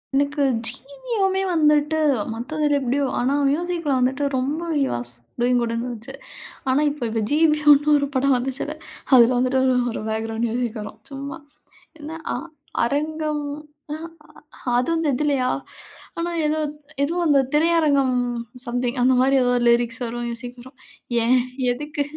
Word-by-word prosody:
எனக்கு 285 +1 +1 0.2
ஜிவியமே 385 - -1
வந்துட்டு 300 -1 +3 0.4
மத்ததுல 290 +5 0
எப்படியோ, 270 +2 0 0.2
ஆனா 255 +3 +1 0.2
மியூசிக்ல 335 0 -1
வந்துட்டு 260 +3 +1
ரொம்ப 280 +6 -1 0.2
"ஹி 280 - +2
வாஸ் 120 0 -4 0.3
டூயிங் 245 0 +3
குட்ன்னு" 230 0 -2
இருந்துச்சு. 240 +2 -7 0.6
ஆனா 260 +3 +3
இப்ப 265 -6 -4
ப்ப 225 0 -1
ஜிபியன்னு 300 -1 +5
ஒரு 280 - 0
படம் 270 +1 +3
வந்துச்சுல்ல. 265 +4 -3 0.4
அதுல 235 -2 +7
வந்துட்டு 255 +1 +2
ஒரு 260 -1 +3 0.2
ஒரு - - -5
பேக்கிரவுண்ட் 225 +1 -2
மியூசிக் 235 -1 -2
வரும். 210 - -8
சும்மா 275 +1 -6 0.6
என்னா 310 +2 -7 0.2
அ - - -1 0.5
அரங்கம் 300 +3 -1 0.5
ம்ஹ்ம்! 325 +2 -6 0.6
அது 250 +5 +1
அந்த 325 -1 0
இதுலயா? 275 -2 +1 0.7
ஆனா, 340 +1 -2
ஏதோ 305 +1 +1
அத் 295 +1 -7 0.3
எதோ 315 +5 -1
அந்த 290 -2 +5
திரையரங்கம் 300 -5 +3 0.5
சம்திங் 245 +1 -2
அந்த 255 +1 +4
மாரி 270 +1 +3
ஏதோ 245 - +2 0.2
லிரிக்ஸ் 235 0 +2
வரும். 240 +1 -4
மியூசிக் 245 +1 -7
வரும். 260 +2 -15 0.5
ஏன்? 250 +2 +4 0.3
எதுக்கு? 290 +3 -3
275 Hz, 140 wpm, -22 LUFS, 245-300 Hz, 0.7 s, அதுல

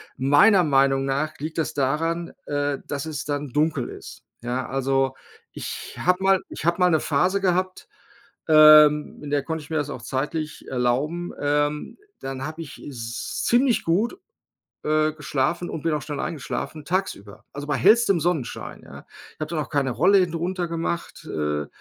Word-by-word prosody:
meiner 175 +9 +5
Meinung 135 -2 +3
nach 140 +3 -2
liegt 155 +2 -5
das 160 - -1
daran, 165 +5 -1
äh, 145 -1 -1
dass 145 +1 -3
es 150 -2 -5
dann 145 -1 -3
dunkel 150 -1 0
ist, - - -11 0.2
ja. 125 +2 -2
Also, 135 0 0 0.4
ich - - -7
habe 180 +1 +1
mal 195 -1 +4
ich - - -8
habe 170 +2 +1
mal 180 - +5
’ne 160 -3 +2
Phase 180 +7 +1
gehabt, 185 0 -1 0.6
ähm, 155 -1 +7
in 145 - -6
der 145 -1 +1
konnte 160 -1 -4
ich - - -15
mir 160 - -1
das 145 -1 -1
auch 125 - -6
zeitlich 150 +5 -4
erlauben, 135 +8 -1
ähm, 145 +1 0 0.2
dann 135 0 -5
habe 155 +2 -6
ich 160 - -10
s 120 -3 -5
ziemlich 245 0 +3
gut, 210 - +1 0.7
äh, 155 0 +2
geschlafen 150 +3 -1
und 155 - -5
bin 165 -1 0
auch 150 - -2
schnell 145 -1 -5
eingeschlafen, 155 0 -4
tagsüber, 150 - -3
also, 145 +1 -7
bei 145 - +1
hellstem 200 - +4
Sonnenschein, 160 -6 -3
ja? - - -12 0.3
Ich - - -40
habe 155 - -3
dann 170 - -2
auch - - -5
keine 140 -3 +1
Rollläden 180 +6 +3
runtergemacht, 170 -1 -3
äh, 75 -1 -2
150 Hz, 170 wpm, -24 LUFS, 135-170 Hz, 0.7 s, ähm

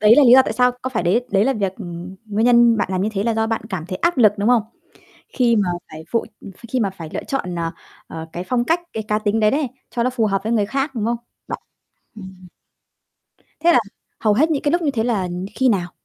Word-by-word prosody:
Đấy 215 +2 +6
là 295 - +7
lý 240 - +7
do 265 +1 +9
tại - - -3
sao, 250 +2 +3
có 260 - -3
phải 225 -7 -1
đấy 215 +8 +1
đấy 195 +1 +3
là 270 - +2
việc 195 -5 -2
ừm, 175 -2 -8
nguyên 215 +2 0
nhân 235 -1 +5
bạn 205 - 0
làm 185 - 0
như 205 - +1
thế 195 - -1
là 230 +1 0
do 220 0 +1
bạn 225 0 -1
cảm 175 -4 -4
thấy 185 - -4
áp 340 - +1
lực, 215 -4 +6
đúng 205 +3 +1
không? 240 -3 +4 0.7
Khi 245 - +2
mà 200 -4 +1 0.2
phải 155 +1 -9
phụ, 230 - +1 0.2
ph - - -13 0.2
khi 255 - 0
mà 205 -4 +1
phải 170 -4 -9
lựa - - -3
chọn, 180 -10 -3
ờ, 165 -1 -2 0.4
ờ, 160 0 -7
cái 175 - -4
phong 240 +4 0
cách 330 +5 +2
cái 220 - -3
cá 210 0 +1
tính 215 +1 0
đấy 215 -1 +3
đấy, 290 -1 0 0.2
cho 235 -1 -1
nó 255 - +2
phù 245 -3 0
hợp 195 -2 0
với 225 - -2
người 210 -3 +2
khác, 270 +4 -2
đúng 215 - -1
không? 235 +1 0 0.3
Bạn - - -4 0.6
ừm. 190 -3 -11 1.1
Thế 345 +1 +5
là, - - +6 0.4
hầu 210 -2 +3
hết 310 +8 +3
những 295 -3 0
cái 290 - +1
lúc 345 0 +1
như 300 - +1
thế 225 -5 -1
là, 230 -5 0
ừm, 180 +1 -4
khi 260 - +2
nào? 180 -6 0
220 Hz, 270 wpm, -20 LUFS, 190-250 Hz, 1.1 s, do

